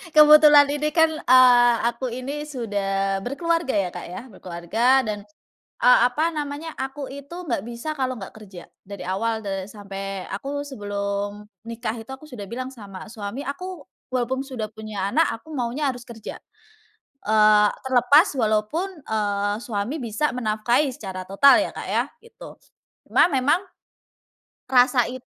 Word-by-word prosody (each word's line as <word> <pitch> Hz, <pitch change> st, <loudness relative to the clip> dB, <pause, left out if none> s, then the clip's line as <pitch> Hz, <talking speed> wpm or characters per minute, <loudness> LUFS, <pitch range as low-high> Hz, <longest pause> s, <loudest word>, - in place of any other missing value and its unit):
kebetulan 300 Hz, -1 st, +8 dB
Ini 295 Hz, +1 st, 0 dB
kan, 320 Hz, -1 st, +5 dB, 0.2 s
eee, 245 Hz, -1 st, +7 dB
aku 240 Hz, +2 st, -6 dB
ini 275 Hz, +4 st, -5 dB
sudah 195 Hz, -7 st, -2 dB
berkeluarga 330 Hz, +2 st, -1 dB
ya, 195 Hz, -3 st, +1 dB
Kak, -, -, -8 dB
ya. 180 Hz, -, -7 dB
Berkeluarga 210 Hz, +8 st, +1 dB
dan, 210 Hz, -1 st, -4 dB, 0.6 s
eee, 250 Hz, -, +7 dB
apa 310 Hz, +6 st, 0 dB
namanya, 300 Hz, +2 st, -5 dB
aku 270 Hz, +1 st, -5 dB
itu 280 Hz, +2 st, -10 dB
nggak 230 Hz, -7 st, -1 dB
bisa 240 Hz, +6 st, -5 dB
kalo 255 Hz, -2 st, -2 dB
nggak 195 Hz, -, -9 dB
kerja, 195 Hz, -5 st, -12 dB, 0.2 s
dari 200 Hz, 0 st, -8 dB
awal 220 Hz, +4 st, -1 dB
de 195 Hz, -1 st, -3 dB
sampai 195 Hz, -2 st, -6 dB
aku 280 Hz, +8 st, -4 dB
sebelum 205 Hz, -3 st, -4 dB, 0.2 s
nikah 230 Hz, -1 st, -4 dB
itu 225 Hz, +2 st, -10 dB
aku 270 Hz, +3 st, -10 dB
sudah 240 Hz, -8 st, -8 dB
bilang 255 Hz, +4 st, -5 dB
sama 200 Hz, -5 st, -10 dB
suami, 215 Hz, +3 st, -6 dB
"Aku 355 Hz, +2 st, -6 dB, 0.3 s
walaupun 255 Hz, +1 st, -1 dB
sudah 245 Hz, -6 st, -5 dB
punya 215 Hz, -3 st, -4 dB
anak, 325 Hz, +2 st, +3 dB
aku -, -, -21 dB
maunya 260 Hz, +3 st, -1 dB
harus 245 Hz, -1 st, -10 dB
kerja." 225 Hz, -3 st, -9 dB, 0.9 s
Eee, 215 Hz, -1 st, +5 dB, 0.2 s
terlepas 260 Hz, -, +5 dB
walaupun, 220 Hz, -, 0 dB, 0.2 s
eee, 205 Hz, -1 st, 0 dB
suami 215 Hz, +5 st, -3 dB
bisa 235 Hz, +5 st, -1 dB
menafkahi 235 Hz, +4 st, +1 dB
secara 190 Hz, -6 st, -7 dB
total 195 Hz, +9 st, +5 dB
ya, -, -, -5 dB
Kak, -, -, -7 dB
ya, -, -, +1 dB, 0.2 s
gitu. 465 Hz, -1 st, -14 dB, 0.5 s
Cuma -, -, +5 dB
memang, 275 Hz, +6 st, +2 dB, 1.1 s
rasa 250 Hz, -1 st, +5 dB
it 255 Hz, 0 st, -9 dB
240 Hz, 145 wpm, -23 LUFS, 205-275 Hz, 1.1 s, kebetulan